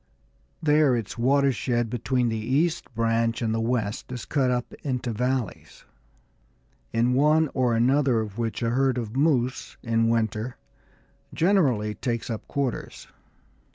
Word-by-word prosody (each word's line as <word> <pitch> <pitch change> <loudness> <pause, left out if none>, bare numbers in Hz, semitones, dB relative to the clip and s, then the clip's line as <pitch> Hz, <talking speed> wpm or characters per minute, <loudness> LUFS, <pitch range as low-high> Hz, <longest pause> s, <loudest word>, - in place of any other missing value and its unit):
There 150 -3 +4
its 115 -5 -4
watershed 125 -2 +1
between 125 0 0
the 110 -1 -2
east 150 +10 0
branch 115 0 +1
and 110 -2 -1
the 115 - 0
west 115 -1 -2
is 125 -2 -5
cut 135 -4 +1
up 125 -1 -2
into 125 -3 -2
valleys, 125 0 -3 1.1
in 120 +2 +2
one 150 +3 +3
or 125 -3 +1
another 130 +1 +3
of 110 0 -5
which 115 +1 -2
a 115 - +1
herd 130 +1 +2
of 115 -1 -4
moose, 135 -4 0
in 115 -1 +1
winter, 115 +1 -1 0.8
generally 140 - +2
takes 115 0 -3
up 110 - -6
quarters. 135 -4 -4
125 Hz, 135 wpm, -25 LUFS, 115-135 Hz, 1.1 s, There